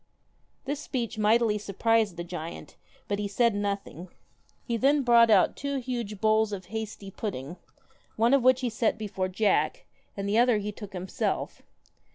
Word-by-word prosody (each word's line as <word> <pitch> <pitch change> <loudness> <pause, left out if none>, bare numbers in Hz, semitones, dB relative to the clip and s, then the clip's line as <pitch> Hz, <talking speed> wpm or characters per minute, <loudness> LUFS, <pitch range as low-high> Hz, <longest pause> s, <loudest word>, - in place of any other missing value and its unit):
This 285 +1 -3
speech 240 -6 -4
mightily 215 0 +3
surprised 210 -1 +1
the 170 - -3
giant, 170 -1 -7 0.3
but 200 0 -2
he 205 - -1
said 230 +3 +2
nothing. 200 -3 -4 0.5
He 235 - -2
then 275 +4 +3
brought 235 -2 +6
out 200 -4 +4
two 280 0 -3
huge 235 -5 -4
bowls 220 0 +2
of 190 -3 -5
hasty 215 -3 -5
pudding, 175 - -5 0.6
one 230 +4 +3
of 275 - +5
which 255 +1 +4
he 250 - 0
set 225 0 0
before 200 -3 -3
Jack, 200 +3 0 0.3
and 200 0 -3
the 210 +3 +2
other 245 -2 +4
he 210 0 -3
took 205 -2 -10
himself. 185 0 -3
215 Hz, 165 wpm, -27 LUFS, 200-235 Hz, 0.6 s, brought